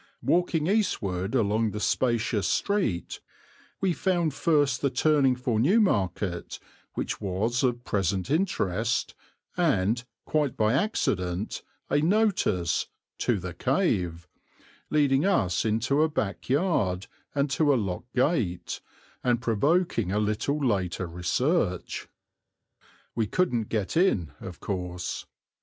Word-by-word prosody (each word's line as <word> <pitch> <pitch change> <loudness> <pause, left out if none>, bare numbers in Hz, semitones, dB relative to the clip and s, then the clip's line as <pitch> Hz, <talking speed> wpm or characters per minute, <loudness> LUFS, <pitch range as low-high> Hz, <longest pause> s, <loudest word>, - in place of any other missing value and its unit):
Walking 170 -3 +2
eastward 110 - 0
along 110 -1 +2
the 105 +1 -5
spacious 115 -2 +1
street 195 - 0 0.6
we 190 -2 +2
found 170 -2 0
first 145 -4 +2
the 140 - +2
turning 135 0 +3
for 125 -3 -1
Newmarket, 105 - +1 0.4
which - - -3
was 105 +5 0
of 120 -2 0
present 95 - -1
interest, 125 - 0 0.4
and, 120 - +1 0.2
quite 150 -4 0
by 110 +1 +3
accident, 100 - -1 0.3
a 145 - +2
notice 170 - +1 0.3
"To 120 - +1
the 90 -2 -6
cave," 90 - 0 0.6
leading 145 -2 +3
us 95 - +2
into 115 +7 +1
a 160 - +3
back 100 - -3
yard 130 - +1 0.3
and 140 0 +2
to 150 0 +3
a - - +4
locked 100 +3 -4
gate, 125 - 0 0.4
and 120 -2 +2
provoking 120 - +1
a 100 - 0
little 105 +7 0
later 95 - 0
research. 90 - -1 1.1
We 110 -2 0
couldn't 120 - 0
get 105 - -2
in, 130 - +2
of - - -8
course. 90 -2 -4
120 Hz, 115 wpm, -27 LUFS, 95-150 Hz, 1.1 s, a